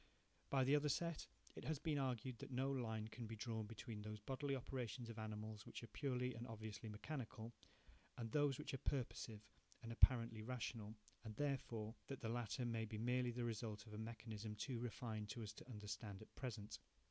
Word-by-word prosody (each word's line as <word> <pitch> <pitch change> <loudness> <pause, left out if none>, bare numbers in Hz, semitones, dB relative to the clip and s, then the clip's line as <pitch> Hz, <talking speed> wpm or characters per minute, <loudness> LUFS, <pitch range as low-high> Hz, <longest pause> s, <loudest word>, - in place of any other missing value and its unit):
By 135 -1 +6
the 135 +3 +7
other 150 0 +5
set, 170 +2 +2 0.3
it - - -5
has 155 -1 +2
been 150 0 +2
argued 125 -2 +1
that - - -5
no 135 +1 +3
line 110 -5 +1
can 115 0 -4
be 115 - -3
drawn 110 -1 -1
between 115 -1 -4
those 105 0 -3
bodily 135 +5 +1
operations 125 -2 -2
of 115 - -5
animals 110 -1 -2
which - - -5
are - - -4
purely 125 -3 +1
and 115 +2 -4
obviously 110 -1 -4
mechanical, 115 0 -3 0.6
and 115 -2 -2
those 145 -3 +5
which - - -3
are 135 - 0
purposive 120 -5 0 0.4
and 115 - -3
apparently 115 -2 +7
rational, 110 -2 -2 0.3
and, 110 -2 -4
therefore, 120 -6 +1
that 135 - -2
the 115 - 0
latter 120 +1 +1
may 115 -1 +2
be 110 0 -3
merely 125 +2 +4
the 120 0 0
result 110 -2 -1
of 105 - -9
a 105 - -3
mechanism 110 -1 -3
too 120 +3 -1
refined 110 -2 -1
for 115 - -2
us 105 0 -3
to 120 - -10
understand 105 -2 -3
at - - -15
present. 110 -6 -3
115 Hz, 195 wpm, -46 LUFS, 110-130 Hz, 0.6 s, the